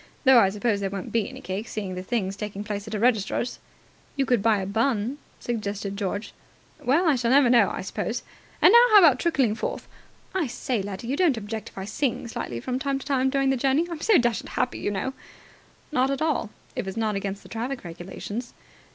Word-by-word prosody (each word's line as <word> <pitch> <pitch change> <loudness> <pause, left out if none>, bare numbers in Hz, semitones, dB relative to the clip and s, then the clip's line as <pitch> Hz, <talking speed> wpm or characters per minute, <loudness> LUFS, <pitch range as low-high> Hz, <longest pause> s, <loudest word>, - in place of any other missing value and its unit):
Though 265 -3 +7
I 195 - +5
suppose 210 +1 0
there 195 -1 -1
won't 195 -1 -6
be 225 -3 0
any - - -10
cake, 195 +4 -4
seeing 200 -4 -4
the 180 - -4
thing's 195 -1 -2
taking 205 0 -5
place 205 0 -5
at 215 - -4
a - - -2
registrar's." 235 0 +1 0.6
"You 275 -1 +1
could 245 -5 +2
buy 220 0 +3
a 190 - -3
bun," 230 +5 0 0.2
suggested 205 -4 -3
George. 200 +1 -3 0.5
"Well, 315 +8 +3
I 310 - +5
shall 240 -2 0
never 265 -1 +5
know, 240 -2 +5
I - - -4
suppose. - - -3 0.4
And 360 - +9
now 470 - +9
how 430 - +8
about 310 -10 +7
trickling 270 -10 +2
forth? 220 - -4 0.5
I 370 -6 0
say, 245 -2 -2
laddie, 195 +2 -6
you 260 +4 -1
don't 310 -7 +3
object 220 0 -5
if - - -24
I 190 - -4
sing 240 +4 -2
slightly 120 - -4
from 255 - -3
time 275 0 -1
to 270 - -9
time 265 -2 +2
during 275 0 +2
the 270 - +1
journey? 275 +6 +2
I'm 325 -2 -5
so 435 -5 +5
dashed 240 -3 0
happy, - - -2
you - - -1
know." 205 +6 -2 0.8
"Not 260 -2 +2
at 275 - -1
all, 310 -8 0 0.3
if - - -3
it's 190 +3 -5
not 220 -2 0
against 195 0 -4
the - - -14
traffic 245 +4 -4
regulations." 190 +7 -7
230 Hz, 220 wpm, -25 LUFS, 200-270 Hz, 0.8 s, And